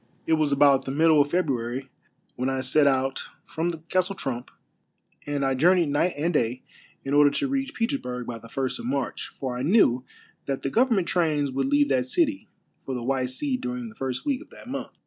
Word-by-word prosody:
It 165 Hz, -, +2 dB
was 155 Hz, -2 st, +2 dB
about 140 Hz, -1 st, +4 dB
the 135 Hz, -, -3 dB
middle 155 Hz, +1 st, +5 dB
of 145 Hz, -, 0 dB
February 135 Hz, -6 st, -1 dB, 0.4 s
when 130 Hz, +2 st, -1 dB
I 135 Hz, 0 st, -1 dB
set 140 Hz, +3 st, +3 dB
out 135 Hz, 0 st, +1 dB, 0.2 s
from 165 Hz, +2 st, -2 dB
the 170 Hz, -, -4 dB
Castle 185 Hz, +2 st, 0 dB
Trump, 125 Hz, -7 st, -4 dB, 0.8 s
and 145 Hz, -1 st, -1 dB
I 135 Hz, -, +2 dB
journeyed 170 Hz, +4 st, +4 dB
night 150 Hz, +5 st, +1 dB
and 165 Hz, +4 st, 0 dB
day 125 Hz, -2 st, 0 dB, 0.4 s
in 135 Hz, -, -2 dB
order 145 Hz, 0 st, +6 dB
to 285 Hz, -, -1 dB
reach 270 Hz, 0 st, -2 dB
Petersburg 225 Hz, -, -2 dB
by 115 Hz, -1 st, -6 dB
the 115 Hz, +1 st, -14 dB
first 130 Hz, +1 st, -2 dB
of -, -, -7 dB
March, 135 Hz, 0 st, -2 dB
for 130 Hz, -2 st, -5 dB
I 125 Hz, -, -3 dB
knew 135 Hz, -, +4 dB, 0.4 s
that 135 Hz, -1 st, -2 dB
the 135 Hz, -, -1 dB
govern 245 Hz, 0 st, +3 dB
ment 190 Hz, -4 st, 0 dB
trains 150 Hz, -5 st, +1 dB
would 135 Hz, 0 st, -1 dB
leave 145 Hz, 0 st, +3 dB
that 130 Hz, -2 st, +1 dB
city 295 Hz, -, 0 dB, 0.3 s
for 130 Hz, -, -4 dB
the 120 Hz, -, -4 dB
White 130 Hz, 0 st, 0 dB
Sea 255 Hz, -, -2 dB
during 250 Hz, -2 st, -4 dB
the 225 Hz, -, -15 dB
first 130 Hz, -, -4 dB
week 280 Hz, -1 st, 0 dB
of 320 Hz, -, -14 dB
that -, -, -14 dB
month. 275 Hz, +2 st, -5 dB
145 Hz, 215 wpm, -25 LUFS, 130-180 Hz, 0.8 s, order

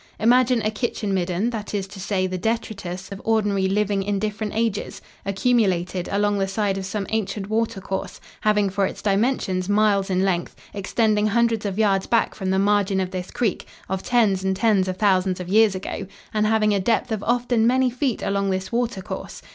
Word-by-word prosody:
Imagine 245 Hz, +1 st, +4 dB
a 215 Hz, -, +1 dB
kitchen 215 Hz, -2 st, -2 dB
midden, 185 Hz, +5 st, 0 dB
that 215 Hz, -2 st, -5 dB
is 195 Hz, -2 st, -1 dB
to 200 Hz, 0 st, -10 dB
say 190 Hz, -1 st, 0 dB
the 185 Hz, 0 st, -3 dB
detritus 195 Hz, -4 st, -3 dB
of 195 Hz, -, -7 dB
ordinary 205 Hz, -4 st, +1 dB
living 200 Hz, 0 st, +1 dB
in 200 Hz, +1 st, -1 dB
different 210 Hz, +1 st, -3 dB
ages, 225 Hz, -2 st, -1 dB, 0.3 s
accumulated 190 Hz, -4 st, +1 dB
along 205 Hz, 0 st, +1 dB
the 195 Hz, -, +1 dB
side 195 Hz, 0 st, 0 dB
of 190 Hz, -, -5 dB
some 200 Hz, 0 st, -3 dB
ancient 205 Hz, -2 st, -2 dB
water 225 Hz, -2 st, 0 dB
course, 190 Hz, 0 st, -5 dB, 0.2 s
having 210 Hz, -1 st, +3 dB
for 195 Hz, 0 st, +1 dB
its -, -, -8 dB
dimensions 200 Hz, -3 st, 0 dB
miles 205 Hz, -2 st, +3 dB
in 185 Hz, 0 st, +1 dB
length, 175 Hz, -3 st, -1 dB, 0.2 s
extending 210 Hz, +1 st, +1 dB
hundreds 225 Hz, -1 st, +1 dB
of 195 Hz, -1 st, -4 dB
yards 200 Hz, -3 st, +2 dB
back 230 Hz, -1 st, +2 dB
from 190 Hz, -2 st, -4 dB
the 190 Hz, -, +2 dB
margin 200 Hz, -1 st, +2 dB
of 185 Hz, -1 st, -2 dB
this 185 Hz, -1 st, -5 dB
creek, 220 Hz, -7 st, -2 dB, 0.2 s
of 190 Hz, 0 st, -2 dB
tens 210 Hz, -6 st, +2 dB
and 190 Hz, 0 st, +1 dB
tens 200 Hz, -3 st, +2 dB
of 185 Hz, 0 st, -3 dB
thousands 185 Hz, -3 st, +2 dB
of 180 Hz, -1 st, -6 dB
years 215 Hz, 0 st, +4 dB
ago, 190 Hz, +1 st, -5 dB, 0.3 s
and 215 Hz, 0 st, +2 dB
having 215 Hz, -1 st, +3 dB
a 200 Hz, -, +2 dB
depth 230 Hz, +5 st, 0 dB
of 215 Hz, -2 st, -1 dB
often 240 Hz, 0 st, +1 dB
many 255 Hz, +1 st, +3 dB
feet 250 Hz, -1 st, -1 dB
along 200 Hz, 0 st, 0 dB
this 190 Hz, 0 st, -2 dB
water 235 Hz, -5 st, -1 dB
course. -, -, -7 dB
205 Hz, 195 wpm, -23 LUFS, 190-220 Hz, 0.3 s, Imagine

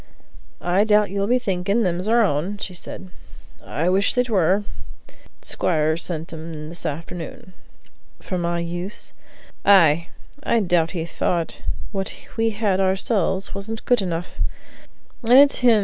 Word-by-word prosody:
"I 180 Hz, +3 st, +3 dB
doubt 210 Hz, -2 st, +3 dB
you'll 200 Hz, 0 st, -1 dB
be 250 Hz, +3 st, +4 dB
thinking 200 Hz, 0 st, 0 dB
them's 180 Hz, +1 st, -1 dB
our 230 Hz, +1 st, +4 dB
own," 180 Hz, +3 st, 0 dB
said 185 Hz, -1 st, -7 dB, 0.5 s
she. -, -, -24 dB
"I 160 Hz, +4 st, -2 dB
wish 195 Hz, +2 st, +2 dB
they 250 Hz, -, +4 dB
were; 195 Hz, -2 st, +2 dB, 0.8 s
t'squire 155 Hz, -2 st, +1 dB
sent 165 Hz, -1 st, -3 dB
'em 160 Hz, +1 st, -7 dB
in 155 Hz, 0 st, -7 dB
this 170 Hz, 0 st, -4 dB
afternoon." 165 Hz, +4 st, -7 dB, 0.7 s
"For 185 Hz, -, -4 dB
my 170 Hz, 0 st, -1 dB
use?" 175 Hz, +3 st, -5 dB, 0.5 s
"Ay; 170 Hz, -4 st, +5 dB, 0.3 s
I 235 Hz, -, +2 dB
doubt 175 Hz, -5 st, +2 dB
he 165 Hz, -, -2 dB
thought 170 Hz, 0 st, -2 dB, 0.3 s
what 195 Hz, -2 st, -3 dB, 0.2 s
we 225 Hz, 0 st, +2 dB
had 205 Hz, -3 st, 0 dB
ourselves 190 Hz, 0 st, 0 dB
wasn't 215 Hz, +3 st, -4 dB
good 245 Hz, -3 st, +3 dB
enough. 175 Hz, -2 st, -4 dB
185 Hz, 135 wpm, -22 LUFS, 170-205 Hz, 0.8 s, Ay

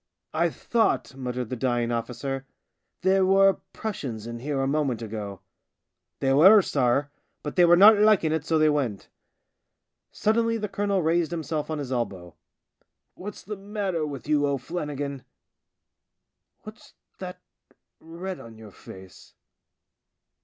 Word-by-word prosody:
" -, -, -58 dB
I 170 Hz, +2 st, +2 dB
thought," 225 Hz, -1 st, 0 dB
muttered 125 Hz, -2 st, -4 dB
the -, -, -1 dB
dying 120 Hz, -1 st, 0 dB
officer, 130 Hz, +3 st, -4 dB, 0.3 s
" -, -, -53 dB
there 190 Hz, +1 st, +4 dB
were 195 Hz, 0 st, +4 dB
Prussians 130 Hz, -, -5 dB
in 120 Hz, 0 st, -6 dB
here 140 Hz, +2 st, -2 dB
a 135 Hz, -, +1 dB
moment 135 Hz, -5 st, 0 dB
ago." 105 Hz, -3 st, -6 dB, 0.4 s
" -, -, -58 dB
They 135 Hz, -1 st, +2 dB
were, 190 Hz, +8 st, +8 dB
sorr, 140 Hz, +1 st, +1 dB, 0.3 s
but 150 Hz, -, -5 dB
they 180 Hz, -, +6 dB
were 175 Hz, 0 st, +7 dB
not 205 Hz, +3 st, +8 dB
liking 210 Hz, -7 st, +4 dB
it, 160 Hz, -2 st, -1 dB
so 160 Hz, +1 st, +1 dB
they 155 Hz, 0 st, +4 dB
went." 135 Hz, -9 st, -1 dB, 1.0 s
Suddenly 230 Hz, +1 st, +1 dB
the 210 Hz, -1 st, -3 dB
colonel 200 Hz, -1 st, -1 dB
raised 165 Hz, 0 st, +1 dB
himself 160 Hz, -2 st, -3 dB
on 155 Hz, -, -2 dB
his 140 Hz, -3 st, -5 dB
elbow. 95 Hz, -9 st, -3 dB, 0.4 s
" -, -, -42 dB, 0.3 s
What's 205 Hz, +2 st, -9 dB
the 210 Hz, -, -6 dB
matter 195 Hz, -4 st, -3 dB
with 145 Hz, -3 st, -6 dB
you, 150 Hz, -1 st, +2 dB
THE 145 Hz, -1 st, +1 dB
SIXTH 130 Hz, -, -17 dB
DRUNK 165 Hz, -3 st, -3 dB
87 -, -, -4 dB
O'Flannigan? 140 Hz, -2 st, -5 dB, 1.4 s
What's -, -, -13 dB, 0.3 s
that -, -, -7 dB, 0.7 s
red 180 Hz, +3 st, -6 dB
on 115 Hz, -1 st, -12 dB
your 110 Hz, -2 st, -12 dB
face 95 Hz, 0 st, -14 dB
150 Hz, 160 wpm, -26 LUFS, 125-185 Hz, 1.4 s, were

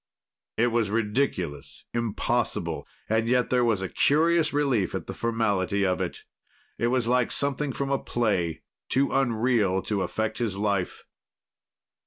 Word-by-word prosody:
It 120 Hz, +1 st, +3 dB
was 115 Hz, -3 st, +1 dB
ridiculous, 95 Hz, -, -2 dB
impossible, 115 Hz, -3 st, -1 dB, 0.2 s
and 110 Hz, +1 st, +1 dB
yet 125 Hz, +1 st, +2 dB
there 125 Hz, -1 st, +3 dB
was 110 Hz, -5 st, +1 dB
a -, -, -1 dB
curious 160 Hz, -, +3 dB
relief 135 Hz, -9 st, +1 dB
at -, -, -4 dB
the -, -, -5 dB
formality 100 Hz, -4 st, 0 dB
of 90 Hz, -1 st, 0 dB
it. -, -, -4 dB, 0.6 s
It 115 Hz, -, +2 dB
was 125 Hz, -1 st, +1 dB
like 125 Hz, 0 st, +2 dB
something 140 Hz, 0 st, 0 dB
from 140 Hz, +2 st, -3 dB
a 135 Hz, -, +2 dB
play, 90 Hz, -9 st, -1 dB, 0.3 s
too 135 Hz, +2 st, +2 dB
unreal 115 Hz, -6 st, +2 dB
to 105 Hz, -2 st, -1 dB
affect 110 Hz, +5 st, -2 dB
his 110 Hz, -5 st, -1 dB
life. 100 Hz, -3 st, -1 dB
115 Hz, 145 wpm, -26 LUFS, 100-125 Hz, 0.6 s, It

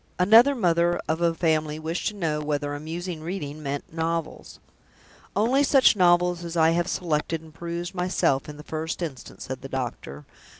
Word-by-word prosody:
Another 225 Hz, +9 st, +6 dB
mother 175 Hz, -5 st, +2 dB
of 160 Hz, +2 st, -1 dB
a 170 Hz, -1 st, +2 dB
family 155 Hz, -3 st, 0 dB
wished 160 Hz, +2 st, -3 dB
to 210 Hz, -, -3 dB
know 160 Hz, -6 st, -1 dB
whether 145 Hz, -1 st, -2 dB
amusing 160 Hz, +3 st, -5 dB
reading 155 Hz, -3 st, -5 dB
meant 145 Hz, +1 st, -5 dB
novels. 165 Hz, -1 st, -3 dB, 0.8 s
"Only 240 Hz, +8 st, +3 dB
such 270 Hz, -4 st, +5 dB
novels 175 Hz, -1 st, +3 dB
as 170 Hz, 0 st, -5 dB
I 160 Hz, 0 st, +5 dB
have 170 Hz, +1 st, 0 dB
selected 165 Hz, -2 st, -1 dB
and 160 Hz, -1 st, -16 dB
perused 170 Hz, +2 st, -5 dB
myself, 180 Hz, -7 st, 0 dB
in 150 Hz, -, -9 dB
the 150 Hz, -, -10 dB
first 160 Hz, +3 st, -4 dB
instance," 140 Hz, -6 st, -7 dB
said 130 Hz, 0 st, -6 dB
the 135 Hz, -, -8 dB
doctor. 120 Hz, -, -5 dB
165 Hz, 170 wpm, -25 LUFS, 150-175 Hz, 0.8 s, Another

